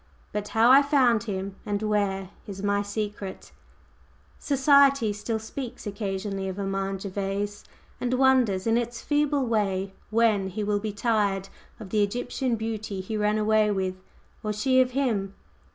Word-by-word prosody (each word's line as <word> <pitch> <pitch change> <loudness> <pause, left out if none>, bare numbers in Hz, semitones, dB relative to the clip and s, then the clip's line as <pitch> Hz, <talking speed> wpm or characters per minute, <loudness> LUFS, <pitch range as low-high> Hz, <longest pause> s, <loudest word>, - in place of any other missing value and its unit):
But 210 0 -3
how 225 +3 +4
I 275 +2 +9
found 255 -6 +3
him, 195 -2 -4
and 205 -1 -2
where, 200 -3 0 0.2
is 195 -1 -7
my 205 0 +2
secret!" 205 -1 -5 0.9
Society 275 -5 +4
still 215 +2 -3
speaks 230 +3 -7
occasionally 195 -1 -3
of 190 - -6
Armand 195 -1 -2
Gervase, 200 +1 -3 0.4
and 250 0 0
wonders 250 -8 +3
in 225 +1 +3
its 240 0 -4
feeble 290 -2 +1
way 195 -4 0 0.2
when 215 -3 +2
he 210 +3 -4
will 205 0 +1
be 215 +1 -3
"tired" 205 -3 0 0.3
of 205 -4 -9
the 215 - +2
Egyptian 245 +4 -1
beauty 220 -3 -4
he 190 +4 -4
ran 210 0 +1
away 215 0 +3
with, 190 -2 -2 0.4
or 215 - -1
she 255 +5 +3
of 255 - +2
him. 205 -8 0
210 Hz, 150 wpm, -26 LUFS, 195-235 Hz, 0.9 s, I